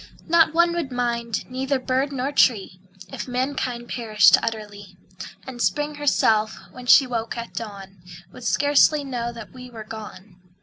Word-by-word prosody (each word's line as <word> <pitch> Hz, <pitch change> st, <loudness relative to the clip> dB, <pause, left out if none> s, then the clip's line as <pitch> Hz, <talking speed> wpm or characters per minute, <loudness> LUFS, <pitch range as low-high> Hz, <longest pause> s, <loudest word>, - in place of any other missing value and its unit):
Not 330 Hz, -1 st, +4 dB
one 340 Hz, +1 st, +3 dB
would 335 Hz, -6 st, -3 dB
mind, 235 Hz, -2 st, -2 dB
neither 265 Hz, +2 st, -1 dB
bird 260 Hz, +2 st, -1 dB
nor 270 Hz, +1 st, -2 dB
tree 205 Hz, -9 st, +2 dB, 0.3 s
If -, -, -6 dB
mankind 250 Hz, -1 st, -3 dB
perished 215 Hz, -6 st, +4 dB
utterly; 205 Hz, -4 st, -6 dB, 0.5 s
And 255 Hz, -2 st, -7 dB
Spring 295 Hz, +5 st, 0 dB
herself, 220 Hz, -7 st, +1 dB
when 250 Hz, -1 st, -11 dB
she 270 Hz, -, +7 dB
woke 230 Hz, -2 st, -4 dB
at 235 Hz, 0 st, -7 dB
dawn, 195 Hz, -4 st, -8 dB, 0.3 s
Would 250 Hz, -, -12 dB
scarcely 290 Hz, +3 st, +3 dB
know 240 Hz, -3 st, -4 dB
that 230 Hz, -3 st, -11 dB
we 250 Hz, -1 st, -11 dB
were 225 Hz, -3 st, -9 dB
gone. 210 Hz, -3 st, -10 dB
245 Hz, 150 wpm, -23 LUFS, 220-270 Hz, 0.5 s, she